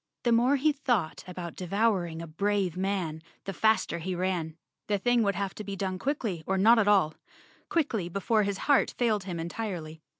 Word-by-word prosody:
The 240 - +2
more 245 +4 +4
he 295 +3 +3
thought 245 - -1
about 180 -2 -6
devouring 180 -3 0
a - - -5
brave 195 +2 0
man, 185 -4 -2 0.2
the 195 - -5
faster 220 -3 +2
he 180 +2 -3
ran. 175 -3 -2 0.3
The 205 - +1
thing 245 +4 +2
would 200 -2 +1
have 195 -1 -2
to 215 - -7
be 200 -1 -5
done 185 -1 -3
quickly 225 - -2
or 190 - +1
not 225 +4 +6
at 210 - +2
all— 190 -7 +4 0.6
quickly 230 - 0
before 200 +4 +1
his 200 -1 -1
heart 285 -2 +3
failed 215 -5 +1
him 175 -3 -4
entirely. 165 -3 -5
195 Hz, 190 wpm, -28 LUFS, 175-225 Hz, 0.6 s, not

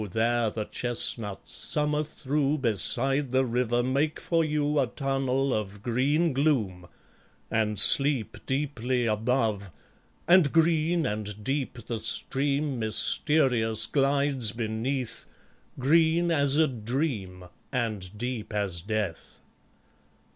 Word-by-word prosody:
there 115 0 +1
the 105 0 -5
chestnuts, 115 -5 -1
summer 150 0 0
through, 150 -1 -1
Beside 135 +3 0
the 130 0 +2
river 120 0 0
make 140 +5 -1
for 165 -1 0
you 150 -1 0
A 135 - +1
tunnel 135 0 -1
of 105 -1 -4
green 140 +7 +1
gloom, 115 - 0 0.6
and 105 -1 0
sleep 135 -2 +3
Deeply 130 -3 -1
above; 110 -2 -1 0.6
and 175 -5 +5
green 165 0 +2
and 105 -2 -4
deep 135 -2 -3
The 115 -2 -4
stream 140 +4 0
mysterious 115 0 +3
glides 140 -5 +1
beneath, 115 +2 -3 0.5
Green 165 +5 +2
as 140 -3 +2
a 160 0 +4
dream 115 - -3 0.3
and 105 -6 -3
deep 120 -1 -5
as 95 -5 -2
death. 105 -3 -4
125 Hz, 110 wpm, -27 LUFS, 110-145 Hz, 0.6 s, and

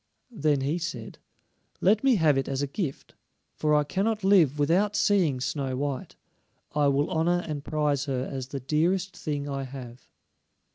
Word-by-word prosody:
Then 150 - +1
he 145 +6 -1
said: 125 -10 -6 0.6
"Let 210 +5 +3
me 270 -3 +5
have 160 -7 +4
it 135 - -1
as 135 +1 -1
a - - +2
gift, 140 0 -5 0.4
for 150 -1 +1
I 150 - +4
cannot 205 +7 -1
live 175 -8 +4
without 180 +8 +2
seeing 175 -10 +2
Snow 135 0 -2
white. 140 -1 -3 0.6
I 150 -1 +3
will 140 +1 +1
honor 175 +2 +1
and 150 -3 -4
prize 150 -3 0
her 130 -2 -2
as 130 -2 -4
the 140 0 -5
dearest 170 +8 0
thing 145 -2 -3
I 140 -1 -3
have." 130 -2 -9
150 Hz, 170 wpm, -27 LUFS, 135-175 Hz, 0.6 s, me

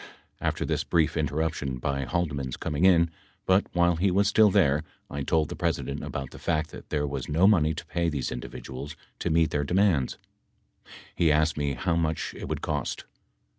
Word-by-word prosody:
After - - -1
this - - -1
brief 80 -2 +1
interrup 80 +1 0
tion 70 -4 -4
by 70 +2 -2
Haldeman's 70 -5 -2
coming 80 +3 0
in, 85 -3 +5 0.3
but 95 +2 +3
while 85 -1 +3
he 95 +4 +2
was 100 +2 +3
still 105 0 +5
there 75 -5 +3 0.3
I 70 - -3
told 80 +2 +1
the - - -5
President 70 +1 -2
about 65 -2 -5
the - - -11
fact 75 0 -1
that - - -11
there 75 -1 0
was 70 0 -4
no 80 +5 +3
money 80 -7 +4
to 85 +2 -7
pay 85 +1 -1
these 70 -5 -3
individuals 65 +3 -7 0.2
to - - -1
meet 80 -1 +3
their 75 - 0
demands. 90 -4 +2 1.0
He 80 -3 +3
asked 75 +1 +2
me 70 -2 -1
how 80 +7 -1
much 80 -2 -1
it - - -7
would - - -3
cost. 75 -3 -2
80 Hz, 190 wpm, -27 LUFS, 70-85 Hz, 1.0 s, in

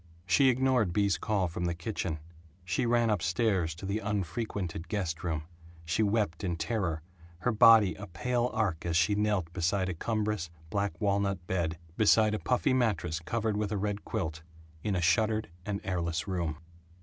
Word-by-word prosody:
She 95 +9 +5
ignored 125 -7 +2
Bea's 100 0 +2
call 100 -4 0
from 85 +1 -3
the 85 -1 -1
kitchen; 85 -2 -3 0.5
she 90 +6 0
ran 120 -1 +3
up 105 - +1
stairs 90 -3 +1
to 90 - -8
the 100 +3 -1
unfrequented 100 -3 -3
guest 90 -3 -2
room; 80 -3 -1 0.4
she 85 +6 0
wept 105 -6 0
in 90 -3 0
terror, 85 -4 -2 0.4
her 125 - +2
body 110 -4 +7
a 105 +4 -9
pale 125 +6 0
arc 100 -8 -1
as 85 -1 +1
she 85 +4 +3
knelt 100 -5 0
beside 95 +1 0
a - - -1
cumbrous 105 -1 -1 0.2
black 100 0 -1
walnut 100 -3 0
bed, 85 -3 -1 0.2
beside 110 0 +5
a 110 - -1
puffy 125 - +1
mattress 95 -10 +1
covered 110 +6 -1
with 105 -1 -1
a 105 - 0
red 105 +1 -2
quilt, 80 -7 -3 0.4
in 105 -2 0
a 90 - 0
shuttered 110 +4 +2 0.2
and 100 -1 -1
airless 85 0 -2
room. 85 -5 -2
100 Hz, 175 wpm, -30 LUFS, 85-110 Hz, 0.5 s, body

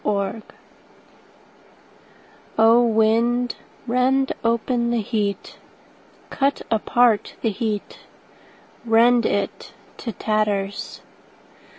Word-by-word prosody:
Heat 200 +1 -1 2.2
O 225 +2 +6
WIND, 230 +2 +2 0.3
rend 260 +2 +1
open 235 +1 0
the 240 -1 0
heat, 205 -2 -3 0.7
Cut 280 +1 0
apart 225 0 +2
the 225 - +1
heat, 210 -1 -4 0.8
Rend 235 +1 +4
it 200 - -3 0.2
to 230 - -5
tatters. 205 -1 -2
230 Hz, 75 wpm, -22 LUFS, 215-240 Hz, 2.2 s, O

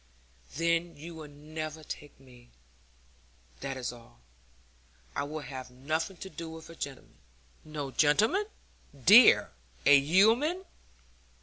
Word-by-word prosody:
'Then 170 +1 0
you 165 +4 -9
will 160 -2 -9
never 155 +2 -7
take 145 -1 -9
me, 125 -2 -18 1.1
that 135 -1 -5
is 125 -1 -4
all. 120 0 -17 1.0
I - - -1
will 155 +1 -6
have 130 -3 -8
nothing 155 +8 -3
to 190 - -8
do 165 -1 -7
with 160 0 -10
a - - -12
gentleman' 140 -5 -8 0.4
'No 150 -3 -6
gentleman, 215 - +3 0.6
dear 215 +6 +8 0.3
a 145 - +8
yeoman.' 225 - +3
155 Hz, 120 wpm, -30 LUFS, 140-170 Hz, 1.1 s, dear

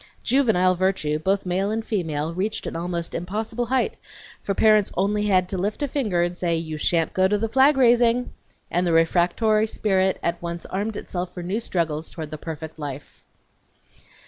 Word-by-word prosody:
Juvenile 220 -9 +3
virtue, 175 -5 0
both 190 +5 0
male 185 +3 0
and 220 +1 -2
female, 160 -6 -2
reached 195 +5 -2
an - - -5
almost 170 0 -3
impossible 220 +7 -3
height, 260 - 0 0.4
for 200 - -2
parents 215 -1 +4
had - - -16
only 210 +2 +1 0.2
to 190 +1 -4
lift 205 +9 -2
a - - +1
finger 215 -11 0
and 175 0 -2
say, 175 -2 0
"you 160 -2 -4
shan't 165 +1 +1
go 190 -2 +3
to 210 +2 +1
the 225 +2 -1
flag 270 +5 +4
raising!" 240 -1 +3 0.4
and 175 +1 +1
the 170 - +2
refractory 180 +7 +3
spirit 190 -3 +1
at 170 0 -1
once 170 0 -5
armed 205 +3 -3
itself 180 0 -4
for 175 - -5
new 190 +6 -1
struggles 165 -7 -2
toward 155 -2 -7
the 155 - -6
perfect 160 0 -7
life. 145 -1 -8
185 Hz, 180 wpm, -23 LUFS, 170-215 Hz, 0.4 s, parents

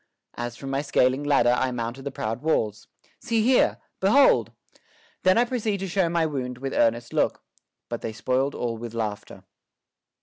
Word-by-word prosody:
As 120 0 -5
from 135 -1 -6
my 135 +1 0
scaling 135 -1 +2
ladder 145 -4 +3
I 130 - 0
mounted 125 +2 -5
the 140 - -3
proud 115 -1 -4
walls. 110 -10 -1 0.3
See 230 -4 0
here! 250 +2 +3 0.2
Behold! 265 +9 +4 0.7
Then 185 +2 +4
I 240 - +4
proceed 225 -4 -1
to 195 - -2
show 180 -1 +1
my 170 -1 +1
wound 130 -5 -3
With 135 +1 -4
earnest 115 +1 +1
look; - - 0 0.4
but - - -5
they 115 - -4
spoiled 130 +4 -1
all 115 -2 -3
with 115 0 -7
laughter. 105 -3 -5
135 Hz, 170 wpm, -25 LUFS, 120-175 Hz, 0.7 s, Behold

